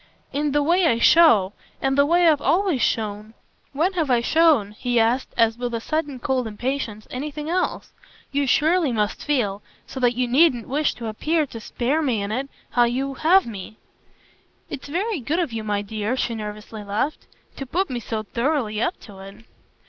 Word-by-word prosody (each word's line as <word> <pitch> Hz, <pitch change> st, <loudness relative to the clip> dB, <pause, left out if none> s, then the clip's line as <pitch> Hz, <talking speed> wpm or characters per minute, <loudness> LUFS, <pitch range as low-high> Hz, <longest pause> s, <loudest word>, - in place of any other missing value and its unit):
"In 290 Hz, +1 st, 0 dB
the 290 Hz, +1 st, +2 dB
way 345 Hz, +3 st, +3 dB
I 230 Hz, -, +2 dB
show 230 Hz, -, +5 dB, 0.3 s
and 270 Hz, 0 st, 0 dB
the 280 Hz, +1 st, +4 dB
way 345 Hz, +2 st, +4 dB
I've 300 Hz, -3 st, +4 dB
always 340 Hz, -2 st, +1 dB
shown. 215 Hz, -1 st, -2 dB, 0.4 s
When 330 Hz, +7 st, 0 dB
have 325 Hz, -6 st, -1 dB
I 245 Hz, -2 st, +4 dB
shown," 295 Hz, -5 st, +3 dB
he 240 Hz, +2 st, -1 dB
asked 235 Hz, +4 st, +1 dB
as 230 Hz, 0 st, +2 dB
with 245 Hz, -1 st, -2 dB
a -, -, -2 dB
sudden 295 Hz, +2 st, -2 dB
cold 255 Hz, -1 st, -1 dB
impatience, 220 Hz, -1 st, -4 dB
"anything 300 Hz, +4 st, -5 dB
else? 365 Hz, +1 st, -2 dB, 0.4 s
You 280 Hz, 0 st, 0 dB
surely 315 Hz, +2 st, +3 dB
must 210 Hz, -2 st, -1 dB
feel 215 Hz, -9 st, 0 dB, 0.2 s
so 265 Hz, -, -7 dB
that 245 Hz, -1 st, +2 dB
you 250 Hz, 0 st, 0 dB
needn't 255 Hz, -2 st, +3 dB
wish 290 Hz, +3 st, 0 dB
to 235 Hz, -, -8 dB
appear 305 Hz, +9 st, 0 dB
to 235 Hz, -4 st, -9 dB
spare 260 Hz, +7 st, -1 dB
me 255 Hz, -8 st, 0 dB
in 200 Hz, -, -4 dB
it 265 Hz, +5 st, -3 dB, 0.2 s
how 240 Hz, -1 st, +4 dB
you 265 Hz, +3 st, -2 dB
'have' 345 Hz, +7 st, +4 dB
me." 215 Hz, -1 st, -8 dB, 0.9 s
"It's 270 Hz, -, -6 dB
very 370 Hz, +6 st, -2 dB
good 285 Hz, +7 st, -2 dB
of 335 Hz, -9 st, -1 dB
you, 225 Hz, -1 st, -3 dB
my 205 Hz, -1 st, -1 dB
dear," 215 Hz, +4 st, -3 dB
she 240 Hz, -, -1 dB
nervously 210 Hz, 0 st, -7 dB
laughed, 210 Hz, +9 st, -3 dB, 0.3 s
"to 270 Hz, -, -6 dB
put 365 Hz, +6 st, -1 dB
me 245 Hz, -, -2 dB
so 220 Hz, -1 st, -4 dB
thoroughly 235 Hz, -1 st, -1 dB
up 350 Hz, -, -1 dB
to 200 Hz, -4 st, -13 dB
it!" 195 Hz, +3 st, -12 dB
255 Hz, 190 wpm, -23 LUFS, 220-300 Hz, 0.9 s, show